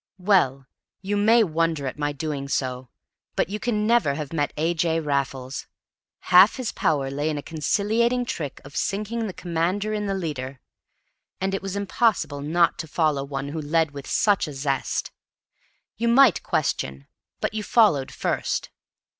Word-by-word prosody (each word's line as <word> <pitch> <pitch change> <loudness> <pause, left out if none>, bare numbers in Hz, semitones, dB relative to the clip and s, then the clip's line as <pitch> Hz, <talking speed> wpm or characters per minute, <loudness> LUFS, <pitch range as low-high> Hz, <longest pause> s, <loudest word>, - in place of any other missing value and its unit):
Well, 180 -9 +2 0.4
you 200 +2 -1
may 220 +3 +5
wonder 165 -4 0
at 130 +2 -5
my 145 0 0
doing 145 -1 -4
so; 130 -2 -2 0.5
but - - +1
you 210 +2 -3
can 210 -3 0
never 225 -11 +3
have 150 0 -5
met 145 -3 0
A. 165 +3 +1
J. 165 0 +1
Raffles. 135 -3 -2 0.7
Half 185 +4 +8
his 255 -4 -3
power 140 -4 0
lay 145 +3 -1
in 150 - -2
a 145 - -5
conciliating 220 +9 +1
trick 150 - -4
of 140 - -12
sinking 215 +3 -2
the - - -4
commander 180 +5 -1
in 210 -1 -2
the 195 - -1
leader. 140 -7 -4 0.8
And 195 +1 -1
it 195 - -1
was 195 0 -4
impossible 200 - 0
not 165 +4 +2
to 160 - -4
follow 150 -3 +1
one 140 0 -4
who 160 +2 -4
led 160 +1 +1
with 140 -1 -9
such 205 -5 +2
a 150 - -6
zest. 135 -1 -2 0.9
You 235 - 0
might 235 -3 +5
question, 65 +1 -2 0.3
but - - -2
you 215 - -2
followed 205 - +3
first. - - -2
165 Hz, 165 wpm, -24 LUFS, 140-205 Hz, 0.9 s, Half